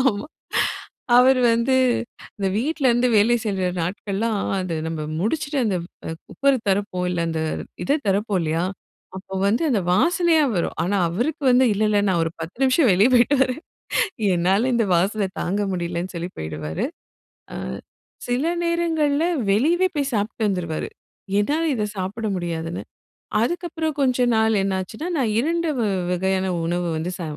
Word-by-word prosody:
ஆமா. 230 Hz, -2 st, +1 dB, 0.9 s
அவரு 255 Hz, 0 st, +5 dB
வந்து 235 Hz, +3 st, +2 dB, 0.6 s
இந்த 195 Hz, -, -1 dB
வீட்ல 285 Hz, +4 st, 0 dB
இருந்து 240 Hz, +1 st, +3 dB
வேலை 225 Hz, +4 st, +4 dB
செய்யிற 190 Hz, -4 st, 0 dB
நாட்கள்லாம் 205 Hz, +4 st, -2 dB, 0.2 s
அத 185 Hz, -3 st, -2 dB
நம்ம 160 Hz, -1 st, -4 dB, 0.2 s
முடிச்சிட்டு 285 Hz, -, -1 dB
அந்த 195 Hz, -4 st, +1 dB, 0.3 s
அ -, -, -3 dB, 0.2 s
குக்கர் 275 Hz, -1 st, +2 dB
திறப்போம் 190 Hz, -2 st, 0 dB
இல்ல. 175 Hz, -1 st, -1 dB
அந்த 160 Hz, -1 st, -2 dB, 0.4 s
இத 285 Hz, -, +2 dB
திறப்போம் 200 Hz, 0 st, +1 dB
இல்லயா! 160 Hz, +2 st, 0 dB, 0.5 s
அப்போ 190 Hz, 0 st, -8 dB
வந்து 220 Hz, +9 st, +2 dB
அந்த 220 Hz, -, +2 dB
வாசனையா 335 Hz, -, +3 dB
வரும். 170 Hz, -, -1 dB
ஆனா, 195 Hz, +4 st, 0 dB
அவருக்கு 245 Hz, -, -2 dB
வந்து 250 Hz, +1 st, +5 dB
இல்ல, 205 Hz, +2 st, -1 dB
இல்ல 205 Hz, -1 st, +3 dB
நான் 175 Hz, -3 st, +2 dB
ஒரு 165 Hz, -, -2 dB
10 165 Hz, +6 st, -7 dB
நிமிஷம் 260 Hz, 0 st, +4 dB
வெளிய 200 Hz, +6 st, +5 dB
போயிட்டு 245 Hz, +4 st, +4 dB
வரேன். 260 Hz, +4 st, -2 dB, 0.7 s
என்னால 190 Hz, +8 st, +2 dB
இந்த 230 Hz, -2 st, +2 dB
வாசனை 195 Hz, +3 st, +1 dB
தாங்க 195 Hz, +4 st, -1 dB
முடியலன்னு 175 Hz, +1 st, -3 dB
சொல்லி 170 Hz, +2 st, -4 dB
போயிடுவாரு. 80 Hz, 0 st, -3 dB, 0.7 s
ஆ -, -, -5 dB, 0.7 s
சில 245 Hz, +5 st, 0 dB, 0.2 s
நேரங்கள்ல 325 Hz, -3 st, +1 dB, 0.3 s
வெளியவே 335 Hz, -, +3 dB
போய் 280 Hz, -1 st, 0 dB
சாப்பிட்டு 215 Hz, +1 st, -1 dB
வந்துருவாரு. 170 Hz, -5 st, -2 dB, 0.5 s
என்னால 295 Hz, +10 st, 0 dB
இத 215 Hz, -4 st, -1 dB
சாப்பிட 200 Hz, +4 st, -3 dB
முடியாதுன்னு. 170 Hz, -1 st, -4 dB, 0.6 s
அதுக்கப்பறம் 325 Hz, +1 st, -2 dB
கொஞ்ச 255 Hz, -2 st, +2 dB
நாள் 220 Hz, 0 st, +3 dB
என்னாச்சுன்னா, 195 Hz, -, -3 dB
நான் 230 Hz, -6 st, +1 dB
2 335 Hz, +4 st, 0 dB
வ -, -, +1 dB, 0.3 s
வகையான 190 Hz, +1 st, 0 dB, 0.2 s
உணவு 175 Hz, +1 st, -1 dB
வந்து 165 Hz, +3 st, -3 dB
ச 175 Hz, -, -5 dB
210 Hz, 145 wpm, -22 LUFS, 180-265 Hz, 0.9 s, அவரு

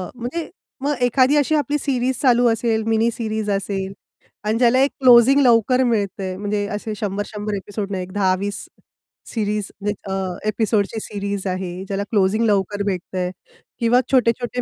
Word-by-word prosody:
म्हणजे 255 Hz, +8 st, -5 dB, 0.3 s
मग 290 Hz, +1 st, 0 dB
एखादी 255 Hz, +3 st, +3 dB
अशी 295 Hz, +2 st, +2 dB
आपली 295 Hz, 0 st, 0 dB
सीरीज 260 Hz, -2 st, 0 dB
चालू 245 Hz, -2 st, +4 dB
असेल, 225 Hz, -1 st, 0 dB
मिनी 225 Hz, +1 st, +2 dB
सीरीज 220 Hz, -2 st, -3 dB
असेल 195 Hz, -1 st, -2 dB, 0.5 s
आणि 215 Hz, +2 st, +1 dB
ज्याला 250 Hz, +1 st, +4 dB
एक 280 Hz, -, +1 dB
क्लोजिंग 255 Hz, +2 st, +7 dB
लवकर 250 Hz, +1 st, +4 dB
मिळतंय 200 Hz, -5 st, -1 dB
म्हणजे 205 Hz, 0 st, -2 dB
असे 210 Hz, +1 st, -4 dB
100-100 205 Hz, 0 st, -4 dB
एपिसोड 200 Hz, +1 st, -5 dB
नाही 185 Hz, -1 st, -2 dB
एक 185 Hz, -, -10 dB
10-20 200 Hz, 0 st, 0 dB, 0.7 s
सीरीज 210 Hz, -2 st, -1 dB, 0.4 s
अ, -, -, -4 dB, 0.3 s
एपिसोडची 215 Hz, 0 st, 0 dB
सीरीज 200 Hz, -1 st, -4 dB
आहे 185 Hz, 0 st, -4 dB
ज्याला 200 Hz, 0 st, -2 dB
क्लोजिंग 210 Hz, +2 st, +2 dB
लवकर 205 Hz, -1 st, +1 dB
भेटतंय 185 Hz, -1 st, -2 dB, 0.5 s
किंवा 240 Hz, +1 st, +4 dB
छोटे-छोटे 245 Hz, -1 st, +1 dB
215 Hz, 145 wpm, -21 LUFS, 200-245 Hz, 0.7 s, क्लोजिंग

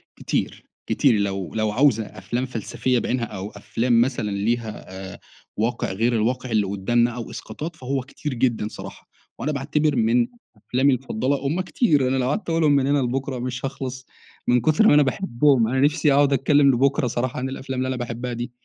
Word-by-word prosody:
كتير، -, -, -3 dB, 0.2 s
كتير -, -, +3 dB
لو 95 Hz, -3 st, -2 dB
لو 110 Hz, -1 st, +1 dB
عاوزة 120 Hz, -2 st, +3 dB
أفلام 120 Hz, +7 st, -4 dB
فلسفية 125 Hz, +1 st, -1 dB
بِعِينها 120 Hz, -1 st, -1 dB
أو 100 Hz, -1 st, -6 dB
أفلام 115 Hz, +3 st, +1 dB
مثلًا 120 Hz, -5 st, -1 dB
ليها 110 Hz, +2 st, -2 dB, 0.3 s
آآ، -, -, -13 dB, 0.4 s
واقع 115 Hz, -2 st, -1 dB
غير 115 Hz, +5 st, +1 dB
الواقع 120 Hz, +2 st, -1 dB
اللي 105 Hz, -3 st, +2 dB
قدامنا 120 Hz, +5 st, +1 dB
أو 120 Hz, -1 st, -6 dB
إسقاطات 155 Hz, +9 st, -7 dB
فهو 135 Hz, 0 st, -2 dB
كتير 145 Hz, +2 st, -6 dB
جدًا 115 Hz, -3 st, 0 dB
صراحة، -, -, -10 dB, 0.3 s
وأنا 150 Hz, -, -1 dB
باعتبر 150 Hz, +1 st, 0 dB
من 120 Hz, +1 st, +3 dB, 0.3 s
أفلامي 130 Hz, +5 st, +2 dB
المفضلة 130 Hz, +2 st, -1 dB
هُم 170 Hz, +6 st, 0 dB
كتير 155 Hz, -, +2 dB
أنا 130 Hz, +1 st, +1 dB
لو 130 Hz, 0 st, 0 dB
قعدت 190 Hz, +2 st, -2 dB
اقولهم 165 Hz, -3 st, +3 dB
من 140 Hz, -1 st, +3 dB
هنا 145 Hz, 0 st, +3 dB
لبكرة 130 Hz, 0 st, -2 dB
مش 125 Hz, +1 st, -4 dB
هاخلص 130 Hz, -1 st, -5 dB, 0.4 s
من 120 Hz, -1 st, +4 dB
كتر 155 Hz, -, +4 dB
ما -, -, +6 dB
أنا 150 Hz, 0 st, +6 dB
باحبهم، 135 Hz, -4 st, +2 dB
أنا 130 Hz, +2 st, 0 dB
نفسي 145 Hz, 0 st, +3 dB
أقعد 140 Hz, 0 st, +4 dB
اتكلم 140 Hz, +2 st, +4 dB
لبكرة 135 Hz, +2 st, +2 dB
صراحة 120 Hz, +1 st, -2 dB
عن 130 Hz, +1 st, -2 dB
الأفلام 130 Hz, -1 st, -5 dB
اللي 130 Hz, -, 0 dB
أنا 130 Hz, -, -1 dB
باحبها 120 Hz, 0 st, -4 dB
دي. 120 Hz, +1 st, -5 dB
125 Hz, 185 wpm, -23 LUFS, 115-140 Hz, 0.4 s, ما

